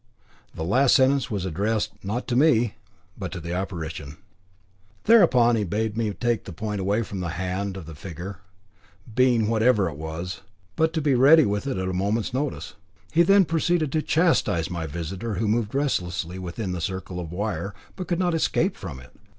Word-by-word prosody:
The 80 - -4
last 125 +10 +4
sentence 135 -2 +3
was 100 -5 -2
addressed, 105 +5 -1
not 110 +6 -3
to 120 - 0
me, 120 -6 +4 0.5
but - - -4
to 90 - -5
the 85 +1 -5
apparition. 80 -5 -5 0.9
Thereupon 130 - +5
he 110 - 0
bade 105 +3 -2
me 110 -2 0
take 120 +2 -1
the - - -7
point 105 +3 -4
away 100 +4 +1
from 100 -2 -6
the 90 -2 -3
hand 95 +1 -3
of 90 - -8
the 80 - -9
figure 90 +4 -8 0.7
being 120 -3 +3
whatever 110 -3 +3
it 80 - -5
was, 80 +3 -5 0.3
but 160 0 +2
to 160 - 0
be 145 -2 +2
ready 140 +5 +7
with 105 +6 -1
it 135 - -2
at 95 0 -2
a 95 - -2
moment's 105 +6 -1
notice. 135 -6 -3 0.4
He 165 - +4
then 195 +2 +6
proceeded 165 -2 +1
to 155 - +1
catechise 130 - +1
my 85 -2 -3
visitor, 90 +8 -4
who 110 +4 -1
moved 110 +2 0
restlessly 90 - -1
within 95 +2 -4
the 90 -2 -3
circle 95 -1 -4
of 85 -2 -6
wire, 100 +1 -3 0.2
but 185 -3 -6
could 175 - 0
not 180 -1 +1
escape 165 +3 +1
from 80 -9 -7
it. 60 -1 -15
105 Hz, 190 wpm, -25 LUFS, 90-130 Hz, 0.9 s, ready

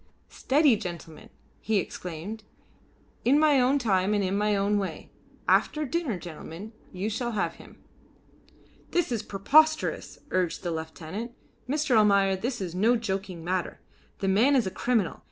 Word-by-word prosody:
"Steady, 285 -2 +3
gentlemen!" 170 -6 -8 0.3
he 220 0 0
exclaimed. 185 +3 -5 0.8
"In 265 +4 +4
my 300 -3 +5
own 260 +3 +3
time 205 -5 +1
and 205 - +1
in 190 +1 0
my 210 0 +1
own 200 +1 +1
way. 195 - -5 0.4
After 305 0 +2
dinner, 275 - -2
gentlemen, 175 +5 -9 0.2
you 190 +3 -3
shall 235 +2 -2
have 205 - -1
him." - - -15 1.1
"This 350 -6 0
is 230 -3 -1
preposterous," 310 +11 +2
urged 180 -3 0
the 175 - -2
lieutenant. 160 +8 -6 0.4
"Mr. 295 -2 +1
Almayer, 200 -2 +4
this 240 +4 -3
is 180 -3 -4
no 220 +7 +3
joking 195 -6 -4
matter. 180 0 -2 0.4
The 195 - -2
man 225 +9 +4
is 250 -5 +3
a 190 - -2
criminal. 230 -5 0
205 Hz, 150 wpm, -27 LUFS, 185-245 Hz, 1.1 s, my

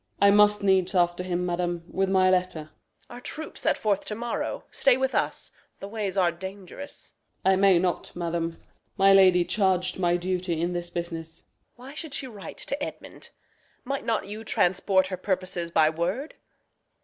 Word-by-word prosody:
Osw. - - +4
I 200 - +7
must 210 0 +5
needs 190 -1 +3
after 175 0 +2
him, 180 -1 -2
madam, 175 -1 -2
with 190 +1 -1
my 190 -1 +4
letter. 185 -3 +1
Reg. 155 - -13 0.4
Our 245 - -9
troops 315 +4 -6
set - - +2
forth 205 -3 0
to 210 - -4
morrow. 235 +2 -3
Stay 265 -2 +4
with 265 0 0
us. - - -1 0.3
The 195 - -7
ways 205 -2 -3
are 180 -2 +4
dangerous. 190 +9 -9 0.3
Osw. 190 - +6
I - - +4
may 195 -1 +5
not, 180 0 -1
madam. 170 -1 -2 0.4
My 195 0 +6
lady 185 -2 +6
charg'd 185 -3 +1
my 175 -1 +2
duty 180 -1 -2
in 175 +2 -1
this 175 0 -4
business. 165 -2 -6
Reg. - - -46
Why 260 +3 -11
should 310 -2 -4
she - - -2
write 210 -6 -9
to 285 +1 -4
Edmund? - - -8 0.5
Might 275 +2 -3
not 225 -2 0
you 215 +2 -7
Transport 190 -1 +2
her 185 -1 -4
purposes 185 -3 -2
by 160 -2 +4
word? 180 - -2
185 Hz, 185 wpm, -26 LUFS, 175-205 Hz, 0.5 s, I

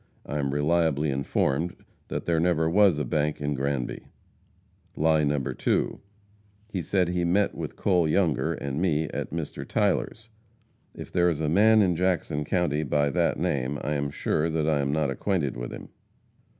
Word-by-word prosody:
I 75 - -3
am 70 -1 -1
reliably 75 0 +1
informed 70 +4 0 0.3
that - - -4
there 85 -2 +1
never 80 -1 +2
was 95 -1 +4
a 75 - -1
bank 75 +4 -1
in 75 0 -1
Granby. 70 -2 -2 0.9
Lie 80 0 +3
No. 75 0 +1
2. 65 - -1 0.7
He 95 -4 -3
said 90 0 +1
he 90 0 0
met 95 +4 +2
with - - -6
Cole 90 -4 +2
Younger 80 -1 +1
and 70 +2 -4
me 80 -4 +2
at - - -4
Mr. 80 -3 -5
Tyler's. 110 0 -1 0.7
If - - -9
there 90 0 +3
is 80 -3 -2
a 80 - -1
man 110 +5 +5
in 90 -3 +1
Jackson 85 -4 0
county 75 -3 0
by 75 -1 +1
that - - +1
name, 70 +1 -1
I 75 - -1
am 70 -1 -1
sure 75 +3 -1
that 80 -1 -1
I 75 -2 +2
am 70 0 0
not 75 -2 0
acquainted 75 -1 -1
with - - -5
him. - - -9
80 Hz, 175 wpm, -26 LUFS, 70-90 Hz, 0.9 s, man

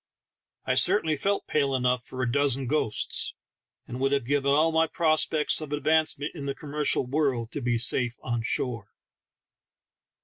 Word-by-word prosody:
I - - +1
certainly 160 -7 +3
felt 200 +7 -1
pale 140 -3 0
enough 125 -1 0
for 130 +1 -5
a 120 - -1
dozen 135 -1 +1
ghosts, 125 -5 0 0.5
and 125 +1 -7
would 135 +1 +1
have 140 -4 0
given 140 +1 0
all 155 +3 +3
my 160 0 +2
prospects 155 -2 +2
of 150 -2 -7
advancement 150 0 0
in 145 -4 -7
the 140 - -3
commercial 150 -2 0
world 130 -4 -1
to 145 - -5
be 120 -1 0
safe 120 +1 0
on 120 -2 -2
shore. 115 -2 -3
140 Hz, 160 wpm, -26 LUFS, 125-155 Hz, 0.5 s, certainly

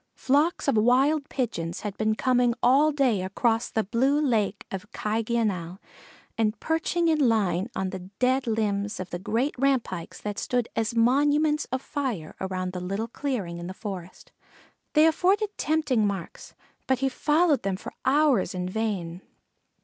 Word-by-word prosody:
Flocks 305 +5 +1
of 275 - +3
Wild 270 +7 +3
Pigeons 175 -10 -3
had 205 -2 -4
been 215 0 0
coming 245 -1 +2
all 280 +5 +5
day 260 -9 +2
across 225 +5 0
the 220 - 0
blue 260 +8 +2
Lake 220 -8 0
of 195 +3 -6
Cayggeonull, 215 -6 -1 0.6
and 215 -1 +1
perching 325 +1 0
in 315 -2 +2
line 195 -4 +1
on 190 -1 -2
the 190 - -5 0.2
dead 255 +1 +1
limbs 210 -2 -1
of 185 -1 -6
the 175 - -4
great 230 +9 -1
rampikes 250 -11 -1
that 205 -1 -4
stood 245 -2 -1
as 225 +1 -1
monuments 290 +6 +3
of 260 +1 -4
fire, 245 - -4
around 185 -1 -3
the 180 - -4
little 195 +5 -3
clearing 215 -11 -3
in 170 - -6
the 190 - -7
forest, 190 -5 -8 0.6
they 305 0 +6
afforded 390 +6 +2
tempting 295 -9 +1
marks; 195 -4 -6 0.3
but 260 - +2
he 270 +2 0
followed 300 +3 +2
them 195 -1 -1
for - - -9
hours 265 - +3
in 180 0 -2
vain. 185 -4 -3
230 Hz, 155 wpm, -26 LUFS, 195-275 Hz, 0.6 s, they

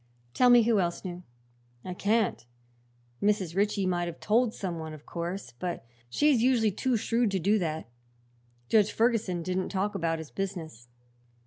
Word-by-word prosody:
"Tell 250 - +4
me 240 -1 +7
who 225 -2 +3
else 175 +1 -2
knew." 180 -1 -5 0.6
"I 185 - -4
can't. 210 - +1 0.8
Mrs. 200 -5 +1
Ritchie 205 0 +1
might 175 -1 0
have 170 -1 -7
told 230 +2 +2
some 180 -6 -4
one, 160 -1 -6
of 150 - -15
course; 170 -6 -5
but 175 -10 -4 0.2
she's 280 - +3
usually 235 -4 +3
too 250 +5 0
shrewd 230 +1 +1
to 195 -1 -1
do 205 +5 +2
that. 160 - -3 0.8
Judge 210 - +4
Ferguson 220 -7 +1
didn't 185 +1 -2
talk 200 +1 -1
about 165 -1 -1
his 160 -2 -9
business." 165 - -5
195 Hz, 160 wpm, -28 LUFS, 170-220 Hz, 0.8 s, me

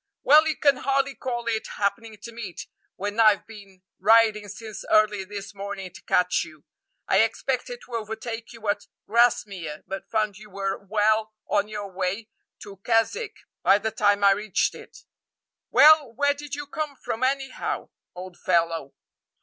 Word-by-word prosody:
"Well, 305 +3 +7
you 310 - 0
can 280 -3 +4
hardly 275 +1 0
call 240 -3 -4
it 225 -2 -1
happening 220 +2 -2
to 235 - -7
meet, 220 -6 -7 0.3
when 205 +3 -4
I've 215 -3 +5
been 200 -4 -14 0.2
riding 215 +1 +4
since 215 +1 -8
early 210 -2 +3
this 200 0 -8
morning 200 -2 -6
to - - -12
catch 180 0 +2
you. 155 -2 -14 0.4
I - - +4
expected - - -1
to 250 - -14
overtake 225 +1 -5
you 225 -2 -9
at 205 - -1 0.2
Grasmere, 200 -9 +1
but 195 0 -7
found 215 -3 -1
you 215 0 -13
were 195 0 -2
well 215 +2 +1
on 205 0 +1
your 205 -2 -6
way 190 +4 -3 0.3
to 200 -1 -11
Keswick 230 - 0 0.3
by 200 - +5
the 220 +2 -3
time 205 -1 +2
I 200 - +7
reached 205 -1 0
it." - - -13 0.7
"Well, 305 -4 +7
where 285 +3 +2
did 290 0 -7
you 290 0 -6
come 295 0 -4
from, 230 -1 -4
anyhow, 270 0 -2 0.3
old 180 0 -9
fellow?" 165 -5 0
215 Hz, 160 wpm, -25 LUFS, 195-235 Hz, 0.7 s, Well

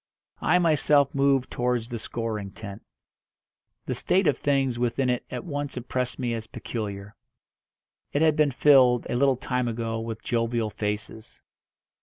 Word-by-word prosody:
I 180 - +4
myself 150 -4 +3
moved 135 -2 +2
towards 125 -2 -1
the 120 -2 -5
scoring 110 -3 -4
tent. 100 -1 -8 1.0
The - - -2
state 190 +1 +1
of 145 - +3
things 135 -4 0
within 125 +2 +1
it 125 - -2
at - - -5
once 145 -4 -4
impressed 125 0 -3
me 125 -3 -1
as 115 -1 -5
peculiar. 100 -3 -6 1.0
It 145 - +1
had 155 -2 +4
been 150 -2 +3
filled, 130 -3 +5
a - - 0
little 135 0 +3
time 125 -1 -1
ago, 115 -1 -2
with 115 -1 -6
jovial 115 -2 0
faces. 105 +1 -5
125 Hz, 150 wpm, -26 LUFS, 115-140 Hz, 1.0 s, filled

